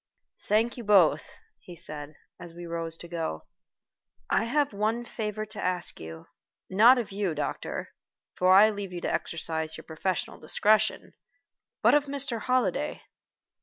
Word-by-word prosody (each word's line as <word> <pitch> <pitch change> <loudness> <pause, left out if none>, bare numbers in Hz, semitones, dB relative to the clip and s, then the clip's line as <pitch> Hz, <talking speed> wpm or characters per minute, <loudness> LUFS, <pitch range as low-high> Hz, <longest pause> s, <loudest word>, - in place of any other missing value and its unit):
"Thank 225 +4 +2
you 240 - -6
both," 185 -8 +4 0.3
he 175 - -12
said, 150 -1 -7 0.2
as 170 -1 -10
we 175 0 -8
rose 165 -1 -3
to 170 - -10
go. 165 - -4 0.9
"I 215 - +3
have 285 +1 +1
one 215 +4 0
last - - -15
favor 215 -1 -3
to - - -5
ask 180 -2 -2 0.7
not 230 +7 +7
of 235 -5 -3
you, 195 -4 -1
doctor, 150 - -4 0.4
for 185 0 +3
I 205 +3 +8
leave 200 -2 -6
you 175 - -5
to - - -1
exercise 160 -1 -3
your - - -10
professional 165 +2 -3
discretion, 215 +7 +1 0.7
but - - +6
of 295 0 +4
Mr. 275 -4 -2
Holliday." 255 +2 0
195 Hz, 150 wpm, -28 LUFS, 165-225 Hz, 0.9 s, I